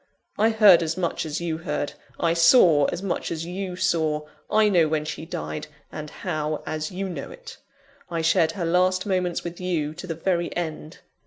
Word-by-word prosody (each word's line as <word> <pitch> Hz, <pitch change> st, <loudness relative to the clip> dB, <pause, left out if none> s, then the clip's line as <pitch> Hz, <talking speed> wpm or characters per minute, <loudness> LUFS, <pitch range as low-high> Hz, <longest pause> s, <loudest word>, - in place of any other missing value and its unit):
_ -, -, -39 dB, 0.3 s
I 220 Hz, +2 st, +3 dB
heard 210 Hz, -6 st, +7 dB
as 165 Hz, +1 st, -2 dB
much 170 Hz, -2 st, -2 dB
as 155 Hz, +2 st, -3 dB
you 165 Hz, -2 st, -2 dB
heard; 150 Hz, -2 st, -3 dB, 0.3 s
I 165 Hz, -1 st, +2 dB
saw 165 Hz, -, +6 dB
as 175 Hz, -, -3 dB
much 195 Hz, -, -2 dB
as 165 Hz, 0 st, -4 dB
you 180 Hz, +1 st, -4 dB
saw; 160 Hz, -4 st, 0 dB, 0.2 s
I 215 Hz, 0 st, +4 dB
know 175 Hz, -6 st, +4 dB
when 155 Hz, -1 st, -1 dB
she 160 Hz, +1 st, -6 dB
died, 75 Hz, -, -5 dB, 0.2 s
and 150 Hz, -1 st, -7 dB
how, 155 Hz, +1 st, -3 dB
as 155 Hz, 0 st, -3 dB
you 190 Hz, +1 st, -3 dB
know 180 Hz, -, -6 dB
it; -, -, -11 dB, 0.5 s
I 165 Hz, -2 st, -2 dB
shared 165 Hz, 0 st, +3 dB
her 180 Hz, -4 st, -3 dB
last 185 Hz, +3 st, +2 dB
moments 180 Hz, -3 st, -1 dB
with 170 Hz, +1 st, -7 dB
you, 160 Hz, -5 st, -1 dB
to 175 Hz, +3 st, -9 dB
the 165 Hz, -, -3 dB
very 170 Hz, +1 st, -1 dB
end. 155 Hz, -2 st, -5 dB
170 Hz, 195 wpm, -24 LUFS, 155-185 Hz, 0.5 s, heard